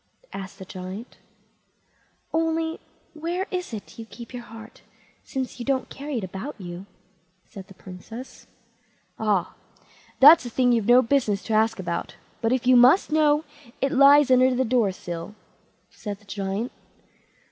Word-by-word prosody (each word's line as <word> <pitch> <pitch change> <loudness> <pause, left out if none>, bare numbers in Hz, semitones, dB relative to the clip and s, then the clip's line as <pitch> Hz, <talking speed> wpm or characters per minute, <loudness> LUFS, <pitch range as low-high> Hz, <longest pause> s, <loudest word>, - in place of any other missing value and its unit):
asked 195 0 -8
the 190 - -9
Giant. 185 +5 -8 1.2
"Only 325 0 0 0.3
where 340 +4 -3
it 360 -4 -4
is 220 +1 -9
you 225 - -7
keep 235 +1 -11
your 245 - -6
heart, 225 -1 -13 0.4
since 260 -1 -5
you - - -4
don't 265 0 -1
carry 285 -1 -5
it 220 - -3
about 190 +10 -6
you", 180 +1 -8 0.6
said 190 -2 -11
the 195 - -15
Princess. 210 +8 -11 0.7
"Ah! 205 -5 0 0.7
that's 300 +4 +9
a 240 - -6
thing 245 +1 +2
you've 230 -4 +1
no 245 +1 +6
business 225 -6 0
to 225 - -3
ask 220 +1 +2
about; 175 -3 -4 0.3
but 225 -1 +1
if 255 -1 0
you 255 0 +6
must 255 +9 +5
know, 300 -1 +3 0.4
it 275 +1 0
lies 280 0 +6
under 255 0 +5
the 260 +1 +1
door 230 -4 +2
sill", 175 +2 -7 0.6
said 205 -2 -7
the 205 - -24
Giant. 200 +3 -4
240 Hz, 155 wpm, -24 LUFS, 200-275 Hz, 1.2 s, that's